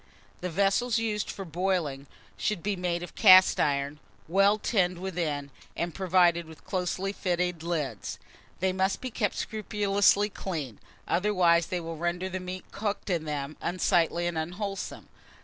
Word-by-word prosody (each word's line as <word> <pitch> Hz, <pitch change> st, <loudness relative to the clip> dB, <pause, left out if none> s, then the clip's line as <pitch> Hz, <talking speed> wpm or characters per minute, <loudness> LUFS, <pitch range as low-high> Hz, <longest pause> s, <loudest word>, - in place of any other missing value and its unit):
THE 180 Hz, -, -3 dB
VESSELS 200 Hz, +7 st, +2 dB
USED 215 Hz, -2 st, -1 dB
FOR 195 Hz, -, -5 dB
BOILING 165 Hz, -5 st, -1 dB, 0.3 s
should 210 Hz, -6 st, -2 dB
be 205 Hz, 0 st, 0 dB
made 175 Hz, -1 st, -2 dB
of 175 Hz, -, -8 dB
cast 185 Hz, 0 st, +7 dB
iron, 140 Hz, +1 st, 0 dB, 0.3 s
well 195 Hz, +5 st, +4 dB
tinned 180 Hz, -5 st, +1 dB
within, 160 Hz, -6 st, -3 dB, 0.3 s
and 170 Hz, -1 st, -2 dB
provided 175 Hz, -3 st, +3 dB
with 160 Hz, -1 st, -14 dB
closely 185 Hz, +1 st, -2 dB
fitting 180 Hz, -3 st, -1 dB
lids. 155 Hz, -, -3 dB, 0.4 s
They 190 Hz, 0 st, +2 dB
must 190 Hz, +1 st, 0 dB
be 255 Hz, -, -5 dB
kept 210 Hz, -3 st, -1 dB
scrupulously 205 Hz, -1 st, +2 dB
clean, 150 Hz, -, -5 dB, 0.3 s
otherwise 175 Hz, -3 st, +3 dB
they 180 Hz, -, -2 dB
will 165 Hz, -1 st, -6 dB
render 175 Hz, +3 st, -2 dB
the 185 Hz, 0 st, -3 dB
meat 185 Hz, 0 st, -6 dB
cooked 205 Hz, -1 st, -3 dB
in 165 Hz, -3 st, 0 dB
them 150 Hz, -1 st, -4 dB
unsightly 175 Hz, -1 st, +1 dB
and 170 Hz, -2 st, -1 dB
unwholesome. 195 Hz, +4 st, -5 dB
180 Hz, 150 wpm, -28 LUFS, 165-195 Hz, 0.4 s, cast